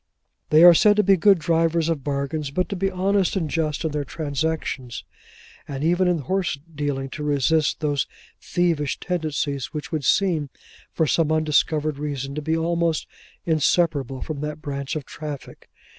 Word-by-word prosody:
They 155 +2 +6
are 175 0 +10
said 205 +5 +5
to 210 - +3
be 195 +1 +5
good 195 +2 +5
drivers 165 0 +1
of 160 -5 -1
bargains, 140 +1 -2
but 180 +6 -1
to 200 - -3
be 195 +1 0
honest 195 +1 +1
and 175 -5 0
just 155 -1 -1
in 160 - 0
their 150 0 -2
transactions, 145 -4 -3 0.6
and 140 -1 -5
even 175 +3 +2
in 175 -1 +2
horse 185 0 -1 0.2
dealing 145 -2 -2
to 150 - -6
resist 150 +2 +1
those 145 -3 0 0.3
thievish 165 -5 0
tendencies 155 -6 -3
which 150 - -5
would 155 -3 -2
seem, 165 -4 +2 0.4
for 160 - +1
some 155 +1 +1
undiscovered 155 -1 +1
reason, 140 -2 -4
to 150 - -4
be 160 +2 0
almost 170 -1 0 0.4
inseparable 155 -4 +1
from 150 -3 -5
that 150 0 -4
branch 140 0 -4
of 150 -3 -4
traffic. 150 -3 -8
155 Hz, 165 wpm, -23 LUFS, 145-170 Hz, 0.6 s, are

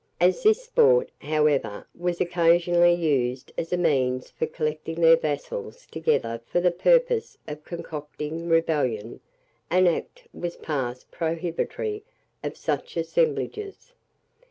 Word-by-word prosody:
As 180 +2 +3
this 435 +3 +4
sport, 485 0 +4
however, 150 -7 0
was 175 0 -2
occasionally 175 0 +4
used 130 -7 0
as 165 - -4
a 180 - +1
means 130 -7 +1
for 160 - -2
collecting 155 +1 -3
their 165 0 +7
vassals 455 - -4
together 115 - -1
for - - +1
the 175 0 +3
purpose 480 - +2
of 150 0 -7
concocting 155 0 -6
rebellion, 145 -9 0 0.5
an 185 +1 +4
act 470 - -1
was 175 -1 -5
passed 130 -5 -4
prohibitory 170 - -3 0.4
of - - -4
such - - -3
assemblages. 470 -2 -2
170 Hz, 120 wpm, -25 LUFS, -, 0.5 s, their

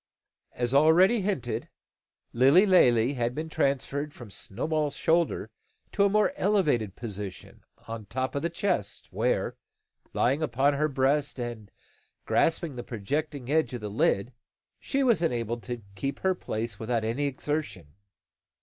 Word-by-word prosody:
As 120 +1 -2
already 175 +10 +5
hinted, 160 - -2 0.6
Lilly 135 - +6
Lalee 125 - +4
had 120 -2 -1
been 160 +1 -4
transferred 140 +1 -1
from 120 -5 -11
Snowball's 150 +10 -2
shoulder 165 +1 +1 0.4
to 200 - +2
a - - +4
more 215 +6 +2
elevated 155 - +1
position, 105 -4 -7 0.2
upon 115 0 -7
the 105 - -16
top 130 +5 -2
of 140 - -2
the 170 - -1
chest 170 - -2
where, - - 0 0.5
lying 135 +5 +1
upon 140 0 +2
her 150 +2 +1
breast, 140 +1 +1
and 120 -4 -5 0.6
grasping 165 -4 +1
the 120 - -4
projecting 140 +4 -3
edge 155 -4 +1
of 120 - -6
the 105 - -4
lid, 105 +3 +1 0.5
she 275 0 -1
was 235 -10 +3
enabled 120 -7 -1
to 120 -3 -5
keep 135 +8 -4
her 190 0 +2
place 110 - -4
without 115 0 -1
any 120 +6 0
exertion. 140 - -4
135 Hz, 145 wpm, -28 LUFS, 115-160 Hz, 0.6 s, Lilly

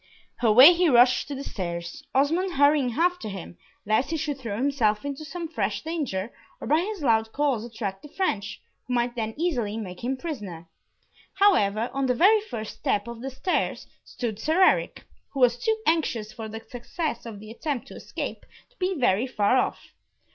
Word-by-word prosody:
Away 250 +8 +9
he 350 -1 +3
rushed 250 0 +5
to 285 - -5
the 275 - -5
stairs, 170 - -5
Osmond 330 +7 +2
hurrying 285 -4 +3
after 355 -4 0
him, 175 - -8 0.3
lest 215 +6 +1
he 325 - -1
should 290 -3 -3
throw 225 -5 -4
himself 240 -4 +1
into 285 +1 -4
some 335 +3 -5
fresh 205 -10 -2
danger, 265 - -3 0.3
or - - -7
by 305 +3 +3
his 390 -2 -4
loud 225 -3 +2
calls 275 -5 0
attract 215 -5 -5
the - - -11
French, 210 - -2 0.3
who 250 - -1
might 240 +1 0
then 220 -2 -3
easily 245 -11 -1
make 185 -4 -7
him 260 +2 -1
prisoner. 205 - -6 0.7
However, 235 - +3
on 275 -1 0
the 250 - +2
very 415 - +5
first 225 - -7
step 205 +2 0
of 235 -1 -7
the 265 - -4
stairs 310 +8 -1 0.2
stood 225 -4 -5
Sir 320 +10 +3
Eric, - - +2 0.3
who 275 - -4
was 245 -1 +4
too 445 0 +1
anxious 245 -10 0
for 220 -2 -7
the 220 +1 -7
success 245 +2 -4
of 215 -3 -8
the 215 +1 -10
attempt 265 +2 -4
to - - -10
escape, - - -6 0.3
to - - -31
be 370 0 -1
very 240 -2 +2
far 215 -2 +2
off. - - -2
250 Hz, 185 wpm, -26 LUFS, 215-310 Hz, 0.7 s, Away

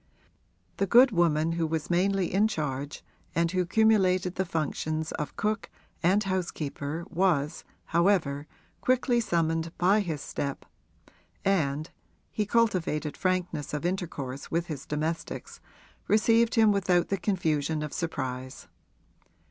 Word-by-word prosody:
The 195 - +1
good 245 +5 +7
woman 165 -3 +2
who 165 -1 0
was 160 +1 -3
mainly 185 +1 +1
in 205 +3 +4
charge 145 -6 -4 0.3
and 170 0 +2
who 185 -1 0
cumulated 185 -3 +3
the 190 - -1
functions 155 0 -2
of 150 - -4
cook 210 0 -1 0.3
and 190 +5 +3
housekeeper 165 -4 -3
was, 170 -4 +1 0.2
however, 165 -5 +1 0.3
quickly 250 -1 +2
summoned 165 -5 0
by 195 +4 +4
his 165 -7 -2
step, 140 0 -4 0.8
and 155 -5 +1 0.4
(he 210 -2 -1
cultivated 180 -10 +1
frankness 180 -6 -1
of 150 - -4
intercourse 150 -8 -3
with 170 +1 0
his 155 -6 -7
domestics) 155 +2 -4 0.5
received 225 +2 +3
him 220 -2 +6
without 185 -3 +2
the 195 - 0
confusion 160 -6 0
of 150 - -5
surprise. 130 -5 -4
170 Hz, 125 wpm, -28 LUFS, 155-195 Hz, 0.8 s, good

